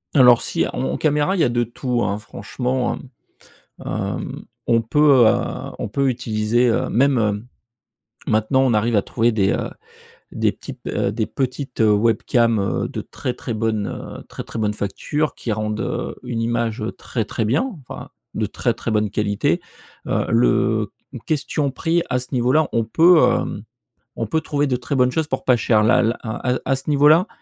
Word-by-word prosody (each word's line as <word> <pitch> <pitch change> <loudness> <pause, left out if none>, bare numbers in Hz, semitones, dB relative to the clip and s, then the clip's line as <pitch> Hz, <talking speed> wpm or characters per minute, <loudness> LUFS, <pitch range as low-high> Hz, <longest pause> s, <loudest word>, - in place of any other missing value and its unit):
Alors 125 -3 +7
si - - -1
en - - -6
en - - -1
caméra 150 +5 +1
il - - -2
y - - +5
a 125 - +3
de 120 0 +1
tout, 120 +1 -2
hein, 100 +1 -1
franchement, 125 +3 -3
mmh, 125 -4 -16 0.6
hem, - - -4 0.2
on 115 -1 +3
peut, 135 +1 +5
heu, - - +4 0.4
on - - -3
peut 135 +5 +1
utiliser, 120 0 +1
heu 115 - +1
même, 115 -4 +1 0.8
maintenant 110 +5 +2
on 125 -4 +3
arrive 110 +1 +2
à 100 - +3
trouver 115 0 +1
des, 100 -3 +2
heu, - - -2 0.6
des - - +1
types - - -11
heu, 100 - 0
des 110 -1 -1
petites 130 0 -4
webcams, 115 +1 +3
heu, 100 -1 -1
de - - -5
très 125 - -5
,très 120 - -5
bonne, 110 -2 -1 0.3
heu, - - -12
très, - - -7
très 115 - -7
bonne 105 -1 0
facture 145 +10 -2
qui 115 - -3
rendent, 105 0 -3
heu, - - -3
une 120 -2 -3
image 115 -1 -1
très, 115 - -3
très 110 +1 -3
bien, 130 - +2 0.2
enfin - - -8 0.2
de - - -1
très, - - -1
très 115 - -4
bonne 105 -1 +1
qualité, 105 0 0 0.5
heu, - - 0
le 115 -2 +2 0.3
question 145 -2 -1
prix 165 +4 0
à 125 0 +1
ce 125 - -6
niveau-là, 130 +5 +3
on 115 - +2
peut, 165 +7 +5
hem, 115 -3 0 0.5
on 115 - -3
peut 160 - +1
trouver 145 -1 0
de 125 -2 0
très 140 - -3
bonnes 125 -1 +3
choses 160 +1 -1
pour 130 - -3
pas 125 -2 +4
cher 110 -1 +3
là 120 +4 +4
là 115 +1 +1
à 120 +2 -3
à - - -3
à 135 - +2
ce 135 - -6
niveau-là, 150 +7 +5
120 Hz, 190 wpm, -21 LUFS, 110-135 Hz, 0.8 s, Alors